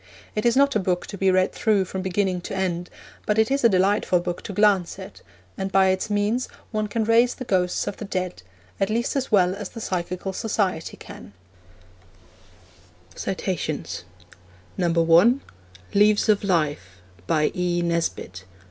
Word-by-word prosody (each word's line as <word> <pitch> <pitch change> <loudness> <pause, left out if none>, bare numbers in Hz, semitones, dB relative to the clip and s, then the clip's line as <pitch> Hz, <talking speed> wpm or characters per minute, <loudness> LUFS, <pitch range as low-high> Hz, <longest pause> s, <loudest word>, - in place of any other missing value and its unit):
It 215 +2 0
is 235 - +2
not 280 0 +4
a - - +3
book 180 -2 -1
to - - -8
be 195 0 +2
read 185 0 +3
through 210 -4 +2
from 190 +1 -5
beginning 185 -1 -1
to - - -6
end, 180 -2 -2 0.4
but 210 - +1
it 220 +3 +3
is 275 -1 +1
a 235 - +7
delightful 190 -1 +2
book 175 0 -4
to - - -5
glance 200 -3 +2
at, - - -10 0.4
and 190 0 -2
by 190 0 +4
its 190 +3 -1
means 210 +4 0 0.2
one 215 -2 -1
can 220 +2 -1
raise 230 +2 +3
the 255 - -7
ghosts 180 -4 0
of - - -4
the 215 - -6
dead, 185 - -3 0.4
at 195 - +1
least 235 +5 -1
as 270 -2 -2
well 185 -3 +4
as 200 0 -6
the 230 - -9
Psychical 185 -1 -3
Society 190 -6 -2
can. - - -12 1.9
(1) - - -2 2.6
Leaves 210 +1 +4
of 210 -1 +3
Life. 150 - -1 0.3
By 155 -1 +2
E. 175 -1 0
Nesbit. 165 - -2
190 Hz, 160 wpm, -24 LUFS, 180-215 Hz, 2.6 s, a